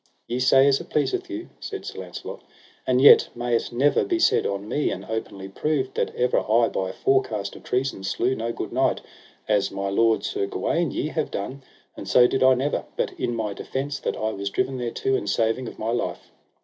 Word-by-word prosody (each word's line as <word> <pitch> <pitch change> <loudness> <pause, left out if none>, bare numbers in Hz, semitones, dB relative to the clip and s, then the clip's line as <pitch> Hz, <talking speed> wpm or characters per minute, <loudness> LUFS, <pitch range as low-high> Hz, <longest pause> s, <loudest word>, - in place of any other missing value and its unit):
Ye 120 +1 -2
say 135 +1 +5
as 140 -1 +3
it - - -12
pleaseth 370 - -1
you, 335 0 -6
said 405 -2 -6
Sir - - -7
Launcelot; - - -8 0.4
and 125 0 +3
yet 140 - +8
may 120 0 0
it - - -1
never 135 +5 +3
be 360 -3 0
said 335 - +3
on 100 +1 -4
me, 145 +6 0
and - - -5
openly 100 -3 -5
proved, 135 +6 -1
that - - 0
ever 125 0 +2
I 115 +2 +2
by 95 -1 -2
forecast 110 -4 0
of - - -11
treason 130 -6 -2
slew 120 +6 0
no 115 -2 -3
good - - -5
knight, - - +1 0.5
as 105 -2 +2
my 100 0 -3
lord, 115 +3 +2
Sir 405 0 -2
Gawaine, 175 - 0
ye 150 - -2
have 155 -1 -2
done; 130 +8 -5 0.3
and - - -8
so 125 - +6
did 135 - +1
I 130 0 +6
never, 135 +3 -1
but - - 0
in 120 - -1
my 110 -3 -2
defence 140 +6 -4
that - - -3
I 110 0 -1
was 100 -1 -4
driven 130 +5 -1
thereto, 120 +2 -1
in 105 - -2
saving 115 +4 0
of - - -9
my 110 +1 -2
life. 120 - -3
125 Hz, 215 wpm, -24 LUFS, 110-140 Hz, 0.5 s, yet